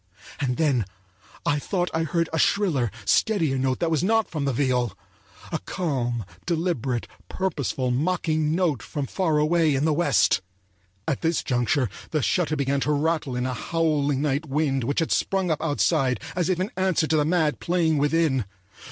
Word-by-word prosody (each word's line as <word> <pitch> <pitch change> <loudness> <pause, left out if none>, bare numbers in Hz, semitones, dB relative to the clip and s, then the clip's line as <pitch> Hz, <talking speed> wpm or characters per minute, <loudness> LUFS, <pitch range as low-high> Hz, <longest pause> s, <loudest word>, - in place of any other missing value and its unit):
And 125 -3 -1
then 140 -9 +2 0.6
I 145 0 +2
thought 180 +3 -1
I 160 - +1
heard 165 +2 0
a 160 - +1
shriller, 155 - +2 0.2
steadier 160 - +2
note 130 0 +1
that 165 -1 +1
was 155 -1 +1
not 225 +2 +2
from 150 -4 -2
the 140 - +1
viol; 125 -4 0 0.5
a - - -1
calm, 120 - -2 0.2
deliberate, 160 -8 -1 0.2
purposeful, 140 -8 -1
mocking 155 +2 0
note 165 - +1
from 145 -3 -4
far 160 +1 0
away 155 0 +3
in 135 +3 +1
the 160 - +3
West.At 95 - -1
this 165 0 0
juncture 125 +1 +1 0.2
the 155 -4 0
shutter 165 -4 +1
began 140 -1 0
to 150 - 0
rattle 150 -2 0
in 125 0 -1
a 130 - -1
howling 145 -1 0
night 145 +1 0
wind 135 -2 0
which 140 +6 0
had 165 - -1
sprung 190 -3 +1
up 155 - -1
outside 145 - +1 0.2
as 180 -1 0
if 180 -2 +1
in 190 +5 -2
answer 185 -4 +1
to 155 0 +1
the 150 - +3
mad 160 -1 +1
playing 165 -3 +1
within. 145 -5 +2
150 Hz, 170 wpm, -25 LUFS, 130-165 Hz, 0.6 s, away